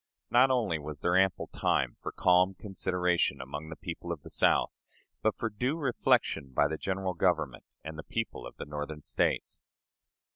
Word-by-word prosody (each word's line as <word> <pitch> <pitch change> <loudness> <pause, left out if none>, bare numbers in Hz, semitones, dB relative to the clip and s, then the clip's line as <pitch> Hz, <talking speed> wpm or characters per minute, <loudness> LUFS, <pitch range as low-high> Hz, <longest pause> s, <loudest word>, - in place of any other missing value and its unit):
Not 125 +3 +6
only 115 -11 +1
was 75 0 -7
there 85 0 +2
ample 95 -1 +3
time 60 -2 +1
for - - -5
calm 90 +1 +4
consideration 90 -3 0
among 75 +4 -6
the 80 - -6
people 85 +1 -6
of 80 -4 -5
the - - -8
South, - - +3 0.5
but 110 - +1
for 115 - -1
due 125 +8 -1
reflection 120 - +1
by 75 - +4
the 80 - -2
General 95 -1 -1
Government 85 - 0 0.2
and 80 0 -7
the - - -5
people 115 +4 -4
of - - -12
the - - -7
Northern 75 +1 -5
States. - - 0
90 Hz, 175 wpm, -30 LUFS, 75-100 Hz, 0.5 s, Not